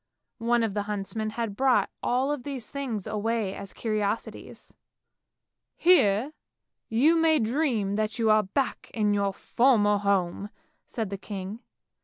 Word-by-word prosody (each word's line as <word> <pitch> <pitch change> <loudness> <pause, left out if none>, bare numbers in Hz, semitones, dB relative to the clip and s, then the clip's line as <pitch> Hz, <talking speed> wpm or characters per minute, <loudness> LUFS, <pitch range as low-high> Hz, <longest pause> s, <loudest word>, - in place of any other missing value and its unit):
One 235 0 +2
of 220 -3 -1
the 205 - -1
huntsmen 210 +2 -3
had 220 -2 -4
brought 265 +2 +2
all 265 +4 +1
these 265 -3 -6
things 250 -8 -4
away 215 -1 -1
as 195 - -8
curiosities. 215 -1 -4 0.5
" - - -60
Here 250 - +4 0.6
you 275 +9 +4
may 320 -1 +4
dream 225 -5 0
that 215 0 -1
you 225 -2 +3
are 215 0 +5
back 230 +7 -2
in 210 -2 +2
your 200 -1 +1
former 210 -1 +2
home! 200 -1 0 0.2
" - - -42
said 220 -4 -4
the 200 - -4
king. 200 +1 -6
220 Hz, 145 wpm, -27 LUFS, 205-245 Hz, 0.6 s, are